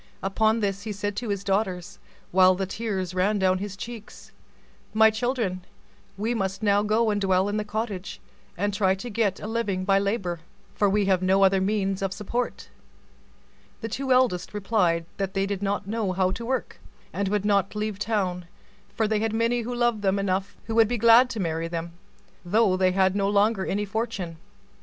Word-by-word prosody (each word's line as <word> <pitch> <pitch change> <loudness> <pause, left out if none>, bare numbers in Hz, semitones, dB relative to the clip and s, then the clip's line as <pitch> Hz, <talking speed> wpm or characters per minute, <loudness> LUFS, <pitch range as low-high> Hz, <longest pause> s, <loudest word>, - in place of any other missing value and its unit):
Upon 220 +3 +1
this 200 -1 -1
he 215 - -5
said 205 0 -3
to 235 -1 -3
his 200 -1 -2
daughters, 190 -3 -2 0.3
while 185 0 +5
the 190 +1 -2
tears 190 -3 -3
ran 195 +3 +1
down 185 -1 +2
his 200 -1 -6
cheeks, 230 0 -9 0.6
"My 220 0 +6
children, 220 -5 -2 0.5
we 220 +4 -1
must 195 -1 -3
now 205 -1 +4
go 215 +1 +2
and 205 -1 -1
dwell 190 0 +2
in 205 +1 -1
the 210 - -1
cottage, 210 -3 -4 0.4
and 205 +2 -1
try 190 -2 +2
to 235 +5 -7
get 205 -3 0
a - - -7
living 210 -4 -2
by 195 0 +4
labor, 195 -4 -2 0.3
for 205 - +2
we 205 +1 +2
have 190 -2 +2
no 190 +1 +3
other 190 0 +4
means 195 -1 0
of 195 -1 -1
support." 235 +5 -3 1.1
The 225 - -4
two 265 +4 -3
eldest 235 -8 +2
replied 185 -5 +1
that 195 -1 -3
they 195 0 +1
did 200 -1 -3
not 200 0 -1
know 205 -2 -2
how 185 0 +1
to 230 +5 -5
work, 260 0 -3 0.3
and 200 0 -1
would 205 0 0
not 200 -1 +1
leave 210 -1 -3
town; 190 -5 -1 0.5
for 220 - +1
they 215 0 +1
had 220 0 -1
lovers 240 -1 0 0.2
enough 195 +1 -2
who 225 - -5
would 225 -1 +5
be 240 +2 -1
glad 235 +3 +6
to 230 - -5
marry 165 -2 -2
them, 170 0 -4 0.5
though 200 +1 +3
they 185 0 +2
had 190 0 +2
no 200 -1 +1
longer 205 -1 +2
any 205 +1 -1
fortune. 200 -5 -4
200 Hz, 185 wpm, -25 LUFS, 190-220 Hz, 1.1 s, My